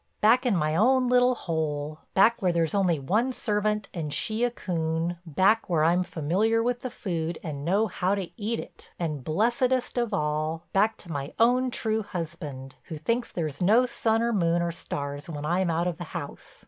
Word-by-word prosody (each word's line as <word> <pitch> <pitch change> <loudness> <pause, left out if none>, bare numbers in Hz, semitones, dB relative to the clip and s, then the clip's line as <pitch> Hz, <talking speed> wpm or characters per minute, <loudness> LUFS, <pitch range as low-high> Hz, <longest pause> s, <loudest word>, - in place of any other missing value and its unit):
Back 245 +4 +4
in 225 - +3
my 155 -2 +1
own 250 +6 +4
little 250 0 +4
hole, 155 -4 -3 0.2
back 230 +4 +5
where 185 -2 +3
there's 165 -2 0
only 185 -5 +2
one 215 - +1
servant 210 -3 -1
and 155 -4 -4
she 220 +9 -1
a 245 - +3
coon, 170 -5 -2
back 190 +9 +2
where 160 -3 +2
I'm 170 +3 +4
familiar 195 +9 +1
with 245 0 0
the 255 - -4
food 170 -7 -3
and 145 -4 -5
know 195 +7 +2
how 185 -1 0
to 195 -3 -4
eat 225 0 -2
it, - - -11
and 155 -6 -3
blessedest 245 - +1
of 240 -2 -1
all, 155 -2 -1
back 210 +3 +3
to 170 - -9
my 140 -1 -4
own 250 +3 +4
true 220 -2 0
husband, 155 -8 -6
who 160 - -6
thinks 230 +10 -1
there's 155 -3 -4
no 220 +7 +5
sun 225 -2 +1
or 235 0 +1
moon 170 -3 +2
or 170 - -1
stars 145 -2 -5
when 150 -2 -5
I'm 175 +3 +1
out 165 +1 +1
of 175 -2 -2
the 175 - -5
house. - - -8
180 Hz, 195 wpm, -27 LUFS, 160-225 Hz, 0.2 s, back